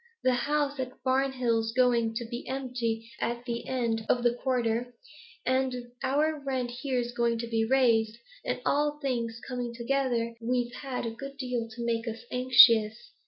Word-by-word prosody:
The 255 - +4
house 285 +2 0
at 255 -1 -5
Barnhill's 255 -4 +1
going 235 -3 +2
to 235 +1 -2
be 240 +2 -6
empty 245 -4 -2
at 240 +1 -2
the 235 -1 -4
end 235 -4 -1
of 245 - +2
the 240 -1 +4
quarter, 245 -1 -1 0.5
and 255 -2 0
our 295 +3 +1
rent 260 -3 -2
here's 250 -4 -1
going 235 -1 +1
to 235 - -3
be 225 -1 +1
raised, 230 -3 +3 0.3
and, - - -2
all 295 +1 +1
things 235 -5 -2
coming 245 -2 -4
together, 235 -2 0
we've 245 +1 -1
had 260 -2 -4
a 230 - -2
good 275 +4 -8
deal 250 -4 -3
to 235 +1 -6
make 230 0 -1
us 225 +1 -5
anxious. 240 -3 +6
245 Hz, 165 wpm, -29 LUFS, 230-260 Hz, 0.5 s, anxious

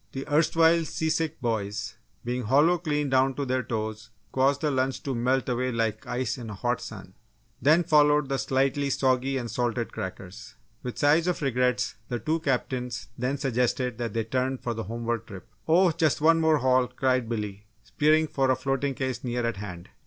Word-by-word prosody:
The 135 0 -5
erstwhile 165 +2 +4
seasick 160 0 -1
boys, 105 -3 -2 0.3
being 125 0 -2
hollow 150 +9 +4
clean 150 -3 -1
down 130 0 +3
to 140 - -2
their 130 0 0
toes, 110 -1 -4 0.2
caused 135 +1 +2
the 150 - +1
lunch 130 0 -1
to 135 - -2
melt 125 +2 0
away 125 0 0
like 115 -2 -2
ice 125 0 -2
in 115 -2 -7
a 105 - -6
hot 120 +4 -1
sun. 95 -4 -9 0.5
Then 155 +7 +5
followed 150 -2 +4
the 135 0 -1
slightly 135 +1 +1
soggy 130 0 +1
and 120 -3 -4
salted 120 -2 -2
crackers. 95 +3 -7 0.3
With 125 - -6
sighs 155 +4 +3
of 180 -3 -1
regrets, 125 -1 0
the 120 - -2
two 155 +6 -1
captains 125 -6 -2
then 125 +3 -1
suggested 125 -2 -1
that 115 -3 -3
they 115 - 0
turn 130 +3 -1
for 120 -1 -3
the 115 -2 -5
homeward 115 +1 -3
trip, 95 +2 -10 0.2
"Oh, 175 +2 +5
just 160 -2 +1
one 165 +2 +4
more 160 -1 +4
haul!" 130 -1 +3
cried 130 -3 0
Billy, 105 -3 -4 0.2
spearing 150 +9 +2
for 135 -3 0
a 130 - +4
floating 135 +1 -1
case 130 -2 -3
near 120 -1 -1
at 115 -4 -2
hand. 90 -4 -8
130 Hz, 185 wpm, -27 LUFS, 115-145 Hz, 0.5 s, Then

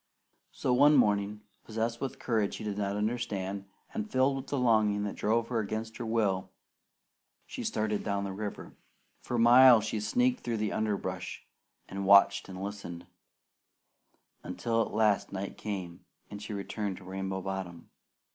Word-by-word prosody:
So 125 - -1
one 145 +4 +6
morning, 105 -4 +2 0.2
possessed 115 +1 -3
with 135 - -3
courage 110 -4 0
she - - -7
did 105 -1 -3
not 100 0 -1
understand, 105 -3 -2 0.3
and 220 -1 -3
filled 130 -1 +2
with 135 0 -7
longing 110 -6 +2
that 105 - -3
drove 115 +2 0
her 120 -2 0
against 110 +1 -4
her 120 - -5
will, 100 -5 0 1.0
she - - -6
started 105 -1 -1
down 100 -1 -1
the 100 -1 -4
river. 105 +1 -6 0.5
For 120 - -3
miles 120 -1 +7
she 110 0 -2
sneaked 250 - +1
through 115 -2 -2
the 105 -1 -1
underbrush, 110 -2 -3 0.4
and 100 0 -5
watched 100 0 +6
and 95 0 -6
listened; 100 -4 -6 1.4
until 115 +6 -1
at - - -2
last 105 -2 +2
night 100 0 -5
came, 95 -5 -6 0.3
and 100 0 -7
she 105 - -7
returned 100 -1 -3
to 95 - -12
Rainbow 95 0 -4
Bottom. 95 -3 -6
105 Hz, 155 wpm, -30 LUFS, 100-115 Hz, 1.4 s, miles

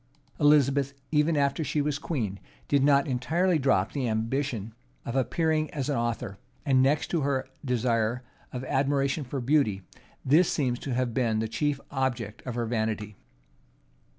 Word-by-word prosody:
[*] 145 - -35
* - - -37
Speed. 145 - 0
Elizabeth, 140 -2 +4 0.2
even 150 +1 +2
after 140 +2 +1
she 150 - -1
was 145 -1 0
queen, 110 - -3 0.3
did 140 -2 +3
not 140 -1 +4
entirely 155 +7 +1
drop 100 -9 +2
the 135 -4 -2
ambition 115 0 -2 0.3
of 120 - -4
appearing 155 +3 +1
as 140 -1 -2
an 145 - +1
author; 115 -4 -2 0.3
and, 130 -2 +4
next 145 +3 +2
to 170 - +1
her 135 -2 0 0.2
desire 120 -2 0 0.3
of 125 0 -5
admiration 140 +2 0
for 135 +1 -4
beauty, 120 -7 +1 0.4
this 160 +6 +4
seems 125 -4 0
to 130 -4 -3
have 125 -2 0
been 115 -3 +1
the 110 +1 0
chief 145 +5 -1
object 125 -6 -2
of 125 - -3
her 120 -1 -1
vanity. 110 -2 -2
135 Hz, 170 wpm, -27 LUFS, 115-145 Hz, 0.4 s, Elizabeth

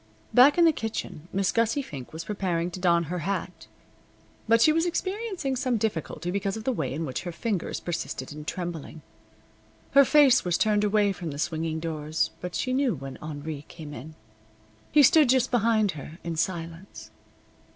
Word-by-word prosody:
Back 265 +5 +7
in 345 - +6
the 325 - +6
kitchen 220 - -5
Miss 195 -1 +1
Gussie 230 +5 +1
Fink 135 - -9
was 160 +1 -6
preparing 180 -4 -2
to 185 - -7
don 170 -2 +3
her 175 +3 -4
hat, 180 -1 -4 0.8
but 230 +1 +5
she 305 +7 +5
was 330 +2 +1
experiencing 375 - -2
some 255 -2 0
difficulty 175 -5 -3
because 195 +1 -2
of 220 - -7
the 260 - +1
way 155 - -2
in 160 +4 -3
which 130 - -4
her 175 - -5
fingers 200 +1 -3
persisted 160 -6 -4
in 150 +1 -8
trembling. 165 -3 -5 0.9
Her 280 +1 +7
face 275 -2 +5
was 175 -1 +1
turned 210 -1 +2
away 205 -1 +3
from 175 -3 -6
the 145 - -6
swinging 160 +1 -2
doors, 155 -1 -2
but 180 -1 -5
she 255 - -1
knew 260 -6 +1
when 135 -1 -8
Henri 150 -1 -6
came 155 -3 -9
in. 150 +5 -9 0.8
He 295 0 +6
stood 305 -1 +6
just 260 0 +3
behind 225 -4 +3
her, 155 +1 -9
in 170 -1 -3
silence. 170 +2 -4
185 Hz, 180 wpm, -26 LUFS, 160-240 Hz, 0.9 s, Back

